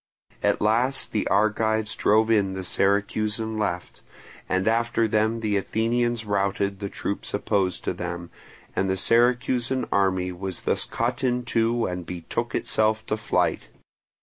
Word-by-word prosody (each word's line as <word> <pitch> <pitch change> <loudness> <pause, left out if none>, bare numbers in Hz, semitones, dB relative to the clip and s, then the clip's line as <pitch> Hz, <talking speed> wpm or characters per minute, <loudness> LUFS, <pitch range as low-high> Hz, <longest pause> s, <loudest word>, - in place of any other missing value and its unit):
At - - +1
last 120 +6 +2
the 105 - 0
Argives 110 +1 +1
drove 110 +2 +3
in 100 -3 +2
the 95 0 -4
Syracusan 105 +3 0
left, 90 -4 -3 0.5
and 95 +2 +1
after 115 0 +2
them 110 +2 +1
the 105 -2 +1
Athenians 115 +3 0
routed 100 -1 0
the 100 -1 -4
troops 100 - -3
opposed 95 -3 0
to - - -1
them, 85 -1 -5 0.4
and 95 - +1
the 95 - 0
Syracusan 120 +3 +2
army 95 -2 +1
was 90 0 -5
thus - - +1
cut 120 +3 -2
in 125 -1 0
two 115 0 +1
and 90 0 -3
betook 90 +7 -4
itself 110 0 +1
to 110 - -1
flight. 110 - 0
110 Hz, 145 wpm, -25 LUFS, 95-115 Hz, 0.5 s, drove